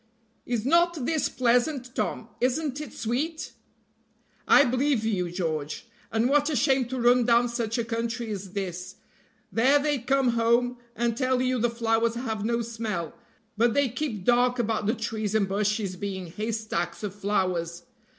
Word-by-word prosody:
"Is 235 -2 -1
not 340 -1 +3
this 315 +1 +1
pleasant, 250 +1 +1
Tom - - -3
isn't 275 +3 0
it 295 -7 -7
sweet?" 290 +8 -3 0.9
"I 285 - +7
believe 255 -2 +1
you, 185 -5 0
George! 160 -3 -3 0.3
and 225 +2 +2
what 290 +2 +3
a 305 - -1
shame 265 +1 +3
to 255 +2 -4
run 245 +1 +5
down 235 +1 +4
such 235 -1 -2
a 235 - -1
country 230 0 -3
as 195 -2 -6
this. 185 -3 -4 0.6
There 260 +6 +4
they 290 -1 0
come 270 +1 +2
home, 235 +1 +2 0.2
and 235 0 0
tell 255 0 +1
you 255 0 +1
the 240 +2 +2
flowers 230 0 +1
have 225 -4 -3
no 235 +1 0
smell, 220 -8 -4 0.4
but 230 +1 +2
they 285 -2 +3
keep 235 -6 -4
dark 245 +1 +3
about 220 -3 -1
the 225 - +2
trees 220 -2 -3
and 205 -3 +2
bushes 205 -1 -1
being 190 -1 -4
haystacks 215 -4 -3
of 200 -3 -3
flowers. 185 -4 -1
235 Hz, 160 wpm, -26 LUFS, 210-255 Hz, 0.9 s, I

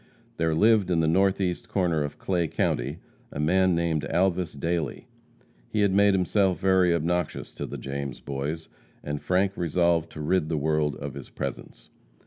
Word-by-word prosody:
There 80 -1 +1
lived 105 +1 +4
in 85 -2 +2
the 80 - +2
northeast 95 +1 +1
corner 85 -5 +1
of 75 0 -5
Clay 90 -3 0
county 70 0 -1 0.3
a - - -6
man 90 +4 +3
named 85 -3 0
Alvas 90 -1 0
Dailey. 85 -2 -2 0.6
He 105 - 0
had 100 -2 +3
made 100 0 +5
himself 95 0 +2
very 95 -2 +3
obnoxious 85 0 -1
to - - -5
the - - -6
James 70 -1 -5
Boys, 70 +4 -4 0.4
and 75 0 -4
Frank 95 +2 +1
resolved 85 -1 +1
to - - -8
rid 80 +1 +1
the 80 - 0
world 75 0 +1
of 70 -2 -6
his - - -9
presence. - - -7
85 Hz, 165 wpm, -26 LUFS, 75-95 Hz, 0.6 s, made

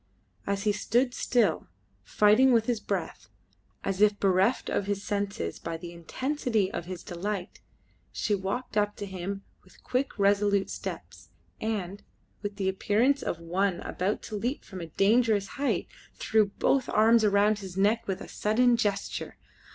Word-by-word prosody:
As 200 0 -1
he 210 - +3
stood 245 +5 +1
still, 245 -1 +1 0.4
fighting 215 +6 +4
with 230 -2 +4
his 235 -2 0
breath, - - -4 0.5
as 195 0 -2
if 210 -1 +4
bereft 195 +5 +2
of 200 - -1
his 200 -1 -2
senses 200 - -3
by 165 0 -4
the 170 +1 -8
intensity 225 - -1
of 170 - -4
his 180 -1 -7
delight, 185 +1 -5 0.5
she 210 - -1
walked 200 +6 -3
up 210 0 +1
to 205 - -5
him 195 +1 -5 0.2
with 185 - -22
quick, 255 +2 -1
resolute 200 0 +2
steps, - - -7 0.3
and, 205 -3 -3 0.4
with 205 -1 -4
the 195 -1 -2
appearance 215 +8 +2
of - - -2
one 180 +2 0
about 190 +4 -2
to 215 - -6
leap 245 +7 -2
from 185 -3 -8
a 165 - -6
dangerous 210 +3 +2
height, 280 0 -1 0.3
threw 220 -2 +2
both 255 +6 +1
her - - -5
arms 225 +1 +5
round 205 +1 +3
his 190 -2 -8
neck 210 +4 +2
with 190 -2 -2
a - - -7
sudden 235 +3 +2
gesture. 205 -3 -2
205 Hz, 160 wpm, -28 LUFS, 190-225 Hz, 0.5 s, arms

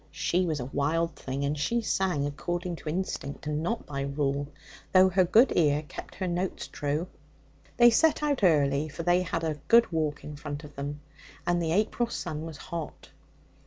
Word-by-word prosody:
She 180 +1 0
was 155 -3 -1
a 125 - -3
wild 155 +5 0
thing, 135 +2 -3
and 145 +2 0
she 235 +11 0
sang 185 -8 0
according 175 +5 -3
to 155 - -6
instinct, 155 -5 -4
and 150 0 -1
not 225 +8 -2
by 140 -1 -4
rule, 140 0 -1 0.5
though 185 0 +7
her 185 0 +4
good 225 +9 +5
ear 150 -2 +3
kept - - -9
her 185 - -3
notes 180 +2 -2
true. 150 +4 -2 0.7
They 240 0 +8
set 310 +6 +3
out 285 -6 0
early, 145 -3 +3
for 165 - -6
they 175 +1 +3
had 165 -2 -2
a 155 -2 -2
good 235 -4 +6
walk 155 -2 -1
in 150 - -7
front 145 0 -6
of 145 -1 -12
them, 145 +1 -5 0.4
and 175 0 +1
the 165 -1 -1
April 215 +5 +1
sun 160 -7 -4
was 160 -3 -8
hot. 165 -3 -7
160 Hz, 190 wpm, -28 LUFS, 145-185 Hz, 0.7 s, They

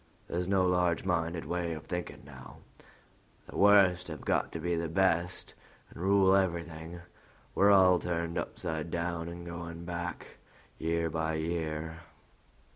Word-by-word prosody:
There's 90 +1 -2
no 95 -1 +3
large 90 -1 +1
minded 85 -2 -1
way 85 -1 -2
of 80 0 -7
thinking 90 +1 -5
now: 65 -3 -12 0.9
the - - -11
worst 95 -3 +5
have 80 -4 -7
got - - 0
to 85 - -4
be 85 +2 -1
best 90 +1 0 0.4
and - - -10
rule 95 0 +4
everything; 85 -2 -2 0.5
we're 100 - +4
all 95 -3 +6
turned 85 -1 -2
upside 80 -2 -3
down 85 0 -2
and 85 0 -8
going 85 0 -7
back 85 0 -5 0.4
year 85 0 0
by 80 0 -1
year." 80 0 -3
85 Hz, 135 wpm, -30 LUFS, 80-90 Hz, 0.9 s, all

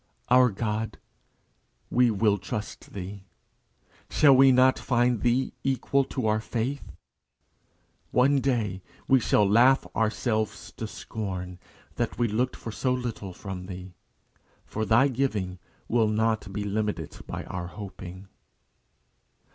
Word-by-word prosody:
Our 125 0 +6
God, 110 +1 -3 0.9
we 125 0 +4
will 105 -1 +2
trust 110 +2 -6
thee. 95 0 -7 0.8
Shall 140 -3 +6
we 135 +1 +7
not 130 +1 +5
find 120 -2 +1
thee 125 +2 +1
equal 135 +1 +1
to 130 -2 -3
our 110 0 +2
faith? 120 +5 -3 1.2
One 135 +3 +4
day, 110 -8 0 0.3
we 135 -1 +5
shall 105 -3 +3
laugh 120 +6 +5
ourselves 110 0 -1
to - - -4
scorn 90 -4 -6 0.4
that - - -2
we 120 0 +2
looked 120 +4 0
for 115 - -7
so 130 +4 -1
little 120 -6 -3
from 90 0 -7
thee; 90 -1 -8 0.7
for 110 0 -3
thy 120 +6 +5
giving 110 -9 -1 0.3
will 115 -2 +3
not 110 -1 0
be 105 +1 -3
limited 105 +1 -3
by - - -5
our 85 -1 -5
hoping. 95 -1 -9
110 Hz, 125 wpm, -27 LUFS, 100-125 Hz, 1.2 s, we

